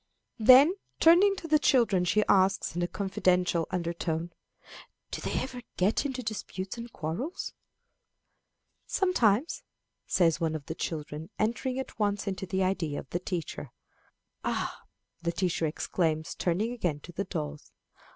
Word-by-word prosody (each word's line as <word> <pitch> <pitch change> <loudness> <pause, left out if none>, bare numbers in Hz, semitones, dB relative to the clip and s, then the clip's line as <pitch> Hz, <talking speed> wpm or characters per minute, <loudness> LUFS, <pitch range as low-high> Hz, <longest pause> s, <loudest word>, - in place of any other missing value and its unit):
Then, 260 +9 +8 0.3
turning 365 +5 +6
to 350 - -7
the 305 -1 +4
children, 230 - +3
she 210 +4 +3
asks, 190 -2 +3
in 175 - -1
a 175 - +1
confidential 180 -3 +1
undertone, 170 -1 -2 0.8
"Do - - -4
they - - -1
ever 255 -1 -5 0.2
get 205 +9 +2
into 260 -2 -4
disputes 200 -3 -4
and 235 0 -8
quarrels?" 180 - -4 1.3
"Sometimes," 315 - +2 0.5
says 170 -1 +3
one 160 -1 0
of 145 -3 -6
the 160 - -4
children, 155 -1 -5
entering 245 +4 -1
at 265 -3 -6
once 205 -1 0
into 190 -1 -3
the 190 +1 0
idea 170 -6 -1
of - - -11
the 175 - 0
teacher. 170 -6 -4 0.7
"Ah!" - - -2 0.4
the 170 0 0
teacher 170 -2 0
exclaims, 155 0 -1
turning 190 +7 0
again 175 -11 -1
to 175 - -10
the 200 +3 -3
dolls. 150 -4 -5
190 Hz, 140 wpm, -29 LUFS, 170-235 Hz, 1.3 s, Then